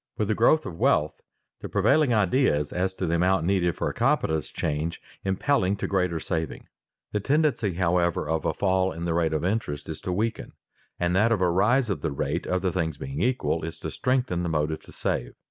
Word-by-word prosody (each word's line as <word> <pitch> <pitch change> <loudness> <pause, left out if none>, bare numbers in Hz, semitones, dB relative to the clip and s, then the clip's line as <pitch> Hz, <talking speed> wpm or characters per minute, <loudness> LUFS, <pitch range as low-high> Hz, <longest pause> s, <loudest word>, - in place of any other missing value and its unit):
With 105 -1 -1
the - - +3
growth 150 +7 +3
of 85 - -7
wealth, 75 +1 +2 0.4
the - - -7
prevailing 155 -5 +3
ideas 105 - +2
as 95 +1 -1
to 95 - -2
the 85 - 0
amount 90 +1 +2
needed 90 -3 +1
for - - -2
a - - -2
competence 80 -3 +1
change, 80 +2 -2 0.2
impelling 95 +1 +1
to 100 - -4
greater 90 -4 0
saving. 80 -1 -4 0.4
The 105 - 0
tendency, 135 - +1
however, 85 -3 +1
of 80 -1 -1
a - - 0
fall 95 -1 +1
in 85 +1 -5
the 85 - 0
rate 85 -1 +1
of 80 +1 -1
interest 90 -8 -2
is 80 - -6
to 90 - -3
weaken, 110 +5 -2 0.5
and 90 0 +1
that 110 +4 +3
of 110 - +2
a 90 -1 +3
rise 110 +6 +3
of 80 -7 -3
the 80 - -1
rate, 70 +4 -2
other 90 0 0
things 80 -5 -2
being 70 +4 -5
equal, 125 -9 0
is 80 +1 -5
to - - -6
strengthen 125 -8 0
the 85 - -2
motive 80 0 -1
to - - -14
save. - - -3
90 Hz, 210 wpm, -26 LUFS, 80-105 Hz, 0.5 s, the